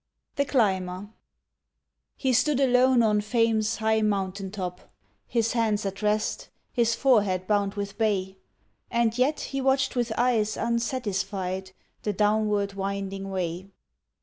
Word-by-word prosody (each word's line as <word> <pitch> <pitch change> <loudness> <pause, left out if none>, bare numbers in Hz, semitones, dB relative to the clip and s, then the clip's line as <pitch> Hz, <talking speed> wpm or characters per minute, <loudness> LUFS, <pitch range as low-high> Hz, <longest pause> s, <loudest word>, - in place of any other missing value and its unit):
THE 280 - +1
CLIMBER 190 -6 0 1.1
He 260 -2 0
stood 255 +4 +2
alone 255 -2 +4
on 210 -1 +3
Fame's 225 0 +1
high 220 0 +1
mountain 195 -2 -1
top, 185 -3 -6 0.4
His 230 -1 0
hands 220 -3 +1
at 195 +1 -4
rest, 210 0 -1 0.2
his 235 -2 +2
forehead 205 -9 +2
bound 200 0 +1
with 200 +1 -5
bay; 195 -3 0 0.5
And 235 -1 +1
yet 260 +5 +1
he 275 0 -3
watched 270 +1 +1
with 240 -2 0
eyes 230 -3 +1
unsatisfied 195 -6 -2 0.3
The 210 - -1
downward 210 -1 +1
winding 195 0 -4
way. 180 -1 -3
210 Hz, 125 wpm, -26 LUFS, 195-235 Hz, 1.1 s, alone